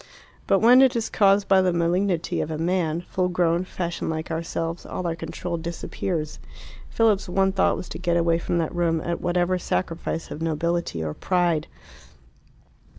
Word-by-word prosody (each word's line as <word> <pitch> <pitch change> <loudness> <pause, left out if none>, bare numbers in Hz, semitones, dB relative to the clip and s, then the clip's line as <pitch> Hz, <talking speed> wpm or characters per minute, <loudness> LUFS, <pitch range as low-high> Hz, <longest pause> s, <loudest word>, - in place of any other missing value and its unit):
But 195 - +3
when 245 +3 +7
it 265 -1 +4
is 230 -1 -2
caused 200 0 +4
by 190 -1 +5
the 185 -1 +2
malignity 175 +1 0
of - - -3
a 155 - -3
man, 170 -1 0
full 180 +1 -1
grown, 175 -1 +1
fashioned 175 -2 -4
like 160 0 -4
ourselves, 165 +1 -3
all 185 - -5
our 165 -1 -1
control 170 +1 -5
disappears. 165 -1 -4 0.5
Philip's 215 -4 +2
one 190 +1 +2
thought 190 0 +2
was - - -6
to - - -7
get 175 -1 +1
away 165 0 +2
from 170 - -1
that 165 -2 -1
room 170 -2 +1
at 170 +1 -3
whatever 180 +1 +1
sacrifice 165 -2 -3
of 155 - -6
nobility 165 - -1
or 75 -1 -3
pride. 175 - 0
175 Hz, 170 wpm, -24 LUFS, 165-185 Hz, 0.5 s, when